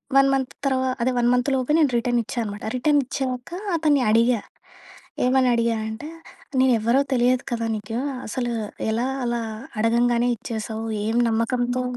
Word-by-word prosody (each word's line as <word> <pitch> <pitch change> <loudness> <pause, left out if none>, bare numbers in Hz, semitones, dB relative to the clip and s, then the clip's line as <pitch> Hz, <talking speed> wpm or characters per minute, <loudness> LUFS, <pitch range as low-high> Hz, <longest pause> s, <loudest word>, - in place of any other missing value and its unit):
1 275 0 +6
month 265 -1 -1
తర్వ 265 -1 +2 0.2
అదే 250 +2 +2
1 240 0 +3
మంత్‌లోపే 260 +2 +1
నేను 295 -5 +3
రిటనిచ్చానమాట. 235 -3 -2
రిటనిచ్చాకా 265 +1 -1 0.2
అతన్ని 305 -4 +3
అడిగా. 230 +1 +4 0.9
ఏమనడిగా 245 -3 +2
అంటే, 225 +8 -7 0.5
నేనెవ్వరో 245 0 +3
తెలియదు 250 +1 +2
కదా 230 -1 -1
నీకూ, 215 +3 -4 0.3
అసలు 240 +2 -2 0.4
ఎలా 235 +3 0 0.2
అలా 240 0 -1 0.4
అడగంగానే 235 +2 +2
ఇచ్చేశావు, 220 -1 -5 0.2
ఏం 225 +2 0
నమ్మకంతో 245 +2 0
245 Hz, 120 wpm, -23 LUFS, 230-260 Hz, 0.9 s, 1